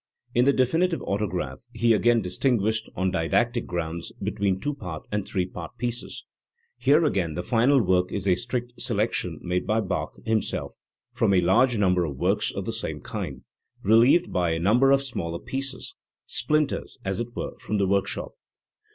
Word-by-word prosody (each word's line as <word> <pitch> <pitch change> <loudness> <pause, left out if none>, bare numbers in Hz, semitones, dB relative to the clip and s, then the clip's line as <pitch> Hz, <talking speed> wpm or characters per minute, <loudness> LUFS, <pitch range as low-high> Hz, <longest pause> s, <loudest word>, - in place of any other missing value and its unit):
In 120 +1 +4
the 140 - +6
definitive 160 +7 +1
autograph 90 -10 -2
he 115 -1 +3
again 115 +2 +3
distinguished, 110 +3 0
on 95 +1 0
didactic 120 +9 +1
grounds, 85 -1 -4
between 100 -2 -1
two 145 +9 -2
part 90 - -7
and 105 -1 -2
three 95 -3 0
part 90 -2 -9
pieces, 120 0 -4 0.5
Here 145 +6 +4
again 90 - 0
the 90 - -3
final 125 +6 +3
work 90 -3 +2
is 100 -1 -2
a 95 - +5
strict 120 +6 -3
selection 105 - 0
made 90 0 -1
by 110 +2 +2
Bach 100 -4 -3
himself 110 -1 -1 0.4
from 100 - +2
a 90 - +4
large 115 +8 +3
number 90 -3 +3
of 70 -5 -4
works - - +1
of - - -5
the - - -3
same - - -4
kind, - - -5 0.4
relieved 120 - +5
by 90 -2 +1
a 80 - -1
number 115 +10 +4
of 135 0 +4
smaller 85 -11 -3
pieces, 135 - -4 0.3
splinters, 150 -2 -1
as 95 +2 -1
it 120 0 -5
were, - - -4
from 105 - -2
the 100 - +2
workshop. 100 0 0
105 Hz, 170 wpm, -25 LUFS, 90-125 Hz, 0.5 s, the